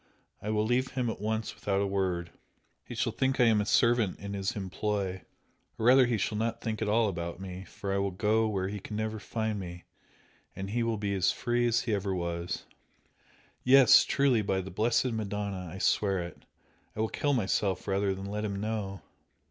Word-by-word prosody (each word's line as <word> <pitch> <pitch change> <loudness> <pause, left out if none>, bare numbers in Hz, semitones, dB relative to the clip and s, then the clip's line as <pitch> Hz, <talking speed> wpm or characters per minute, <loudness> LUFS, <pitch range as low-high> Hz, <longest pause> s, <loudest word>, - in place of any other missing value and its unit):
I 105 - -4
will 105 0 +1
leave 125 +3 +1
him 125 -3 0
at 100 - -8
once 110 +1 -2
without 100 -1 -1
a 100 - +1
word 95 -3 -1 0.5
he - - -8
shall - - 0
think 130 0 0
I - - +7
am 110 -3 +4
a 105 - -3
servant 115 -4 +3
in 100 +1 -6
his 100 -1 -2
employ 95 -1 -2 0.6
or 110 - -2
rather 130 +1 +7
he 120 -2 +1
shall 105 +2 -1
not 115 +1 -1
think 110 -1 -3
at 110 - 0
all 110 +1 +3
about 85 -2 -4
me 95 0 -7
for 100 0 -5
I 100 - +1
will 100 0 +1
go 110 +4 +1
where 95 -3 -1
he 105 +1 -4
can 105 - -7
never 110 0 -2
find 110 0 -2
me, 90 -2 -7 0.7
and 95 +1 -5
he 120 +2 0
will 115 -1 0
be 100 -1 -2
as 95 -1 +2
free 120 0 0
as 120 +1 +1
ever 100 -3 0
he - - -1
was! 85 0 -3 1.0
Yes, 130 0 +8
truly! 135 -5 +2
by 95 -2 0
the 95 +1 -8
blessed 115 +6 +1
Madonna 100 -4 -3
I 95 - -7
swear 95 0 +2
it! 85 - -10 0.5
I - - -7
will 110 - +2
kill 145 -1 0
myself 100 -5 0
rather 100 0 +1
than 95 +1 -7
let 105 +2 -3
him 100 -2 -2
know!" 105 -3 -3
105 Hz, 205 wpm, -30 LUFS, 95-110 Hz, 1.0 s, Yes